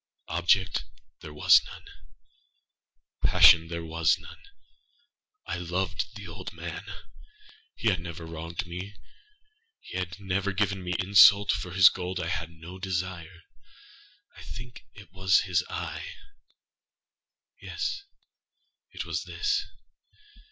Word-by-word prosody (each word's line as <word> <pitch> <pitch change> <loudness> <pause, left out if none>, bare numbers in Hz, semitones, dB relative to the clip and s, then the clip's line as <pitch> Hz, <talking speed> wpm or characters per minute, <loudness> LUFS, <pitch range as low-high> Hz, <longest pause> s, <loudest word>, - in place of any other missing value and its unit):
Object 85 +3 +2 0.4
there 75 - -10
was 75 - +6
none. - - -12 1.4
Passion 80 -1 +7
there 85 0 -5
was 80 -1 +2
none. - - -13 1.0
I - - -3
loved 90 +2 -3
the 100 -3 -9
old 85 +4 -8
man. - - -7 0.9
He - - -4
had 90 - -1
never 85 -1 -8
wronged 80 +2 -6
me. 90 +4 -7 0.8
He 90 - -6
had 90 +1 -5
never 100 0 -1
given 95 -1 -1
me 90 0 -2
insult. 100 +2 +7
For 90 - -3
his 90 -3 +8
gold 90 +1 -5
I 80 - -3
had 85 -1 -3
no 85 +3 -11
desire. 90 -2 -4 0.9
I - - -13
think 120 0 -10
it 100 -1 -14
was 95 -1 +3
his 90 -2 0
eye! - - -5 1.5
yes, 405 0 -3 0.9
it - - -6
was - - -3
this! 415 0 -1
90 Hz, 120 wpm, -27 LUFS, 85-100 Hz, 1.5 s, his